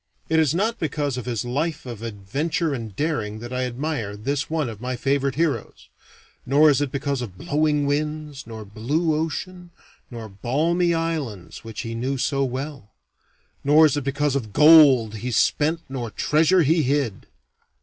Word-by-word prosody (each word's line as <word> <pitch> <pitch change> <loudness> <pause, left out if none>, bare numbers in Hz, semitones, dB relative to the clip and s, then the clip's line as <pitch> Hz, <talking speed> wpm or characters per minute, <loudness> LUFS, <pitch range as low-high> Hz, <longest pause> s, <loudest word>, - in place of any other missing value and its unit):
It 160 0 +3
is 155 0 +2
not 220 +5 0
because 145 -4 -2
of 125 -2 -6
his 120 -2 -2
life 150 +5 -2
of 120 -4 -7
adventure 140 - -2
and 115 -6 -6
daring 110 -8 -2
that 120 +3 -8
I 130 0 -1
admire 125 -5 -3
this 140 +6 -2
one 160 -3 -1
of 110 -2 -8
my 125 0 -3
favorite 140 +1 0
heroes; 160 -1 -2 0.5
nor 150 +3 +5
is 140 - +1
it 145 -3 -1
because 140 -1 -2
of 100 -7 -7
blowing 150 -2 +1
winds 150 -1 -3
nor 110 -2 -8
blue 140 - -1
ocean 175 +3 -4 0.4
nor 115 -3 -7
balmy 160 - 0
islands 145 - -4
which 115 -2 -6
he 115 -1 -5
knew 130 +4 -2
so 135 +1 0
well; 135 -3 -5 0.7
nor 150 +3 +6
is 150 -3 +2
it 145 - -2
because 140 +1 0
of 110 -7 -3
gold 140 -8 +7
he 125 +4 -4
spent 155 +7 +1
nor 130 -4 -5
treasure 160 - +3
he 160 +3 +3
hid. 135 -6 -1
140 Hz, 170 wpm, -23 LUFS, 120-155 Hz, 0.7 s, gold